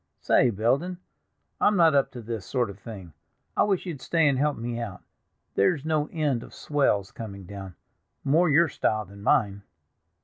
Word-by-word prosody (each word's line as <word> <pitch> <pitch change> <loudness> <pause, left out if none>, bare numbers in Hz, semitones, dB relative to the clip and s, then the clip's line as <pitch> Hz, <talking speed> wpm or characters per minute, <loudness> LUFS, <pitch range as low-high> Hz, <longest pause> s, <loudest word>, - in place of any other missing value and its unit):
Say, 125 - +4
Belden, 130 - 0 0.6
I'm 205 -1 +3
not 165 -3 +6
up 140 -1 +3
to 120 -2 -8
this 115 -2 -4
sort 120 0 -1
of 100 - -14
thing. 100 -6 -9 0.4
I - - +2
wish 195 -3 +1
you'd 160 -8 -6
stay 165 +1 +2
and 140 - +3
help 150 +1 +1
me 120 +1 -4
out—there's 115 - -3
no 155 -2 0
end 150 -7 0
of - - -12
swells 120 -10 0
coming 100 -4 -8
down, 95 -2 -8 0.5
more 160 +5 +3
your 165 +4 +5
style 110 -6 -1
than 100 +1 -13
mine." 100 -2 +2
120 Hz, 170 wpm, -26 LUFS, 100-155 Hz, 0.6 s, not